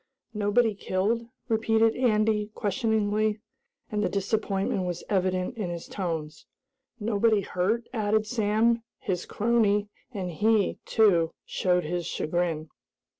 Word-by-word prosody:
"Nobody 215 +2 +2
killed?" 205 +4 -1 0.2
repeated 225 -1 +2
Andy 215 -3 +2
questioningly, 215 0 0 0.5
and 210 -1 0
the - - +1
disappointment 195 -1 -1
was 175 -1 -3
evident 185 +4 0
in 200 -5 -2
his 170 -1 -5
tones. 165 -6 -4 0.5
"Nobody 215 0 +2
hurt?" 195 +6 -1
added 215 -1 +1
Sam, 225 +1 +2 0.2
his 185 -6 -3
crony, 210 -2 +2 0.2
and 190 -6 -4
he, 210 +4 +2
too, 175 -7 +3
showed 180 -1 +1
his 175 +1 -3
chagrin. 160 -1 -1
205 Hz, 115 wpm, -27 LUFS, 185-220 Hz, 0.5 s, too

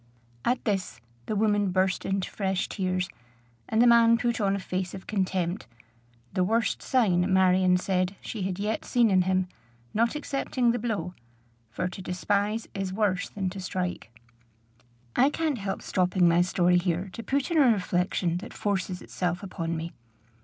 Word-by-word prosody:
At 245 +1 0
this 195 - -1 0.3
the 215 - -1
woman 205 -1 +2
burst 185 0 +1
into 195 -1 -1
fresh 190 -2 -1
tears, 185 -2 -1 0.6
and 220 - +1
the - - +5
man 230 -1 +6
put 235 -1 -1
on 195 -1 +2
a - - -2
face 185 0 -3
of 190 - -9
contempt, 185 -2 -1 0.7
the 185 - +2
worst 225 +5 +1
sign, 190 -7 +2
Marion 185 -1 +4
said, 185 +1 0
she 220 - -6
had 185 -1 -2
yet 210 +2 -2
seen 235 -3 +3
in 185 -1 +5
him, 185 0 +1 0.5
not 230 +5 +1
excepting 275 -4 0
the 240 - -1
blow; 215 -5 -2 0.6
for 120 +10 -2
to 185 +1 -7
despise 205 +4 -1
is 195 -1 -3
worse 200 -1 0
than 195 -2 -3
to 195 - -7
strike. 180 -7 -3 1.1
I 270 +3 +5
can't 300 -4 -1
help 195 -1 -4
stopping 180 -1 +2
my 170 +1 +4
story 180 0 +3
here 180 +1 -2
to 230 - -6
put 275 +6 -1
in 330 - +3
a 270 -4 +6
reflection 180 -3 0
that 180 - -9
forces 190 -3 -2
itself 180 +1 -3
upon 170 -4 -3
me. 165 +1 -5
190 Hz, 165 wpm, -27 LUFS, 180-220 Hz, 1.1 s, man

